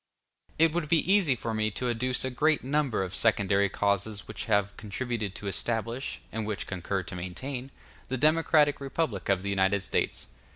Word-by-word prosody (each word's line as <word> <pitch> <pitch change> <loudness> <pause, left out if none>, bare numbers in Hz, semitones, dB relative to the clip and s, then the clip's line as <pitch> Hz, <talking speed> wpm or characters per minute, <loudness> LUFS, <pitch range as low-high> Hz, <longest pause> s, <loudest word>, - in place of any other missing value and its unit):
It 165 0 +5
would 170 -3 -1
be 170 +3 +3
easy 175 -10 +4
for 115 -1 -4
me 110 0 +1
to 125 - -1
adduce 125 +2 0
a 130 - -2
great 155 +4 +2
number 135 -6 +1
of 95 0 -5
secondary 100 -3 +2
causes 100 +1 -1
which - - -6
have 100 0 +1
contributed 110 -1 -4
to 100 - -6
establish, 115 +6 -2
and 110 0 -3
which 105 -2 -3
concur 95 +1 -3
to 90 - -8
maintain, 125 +9 -5 0.4
the 130 - -2
democratic 150 0 +4
republic 135 - -2
of 95 -1 +2
the 100 - -2
United 95 0 +2
States. - - -1
115 Hz, 175 wpm, -28 LUFS, 100-135 Hz, 0.4 s, It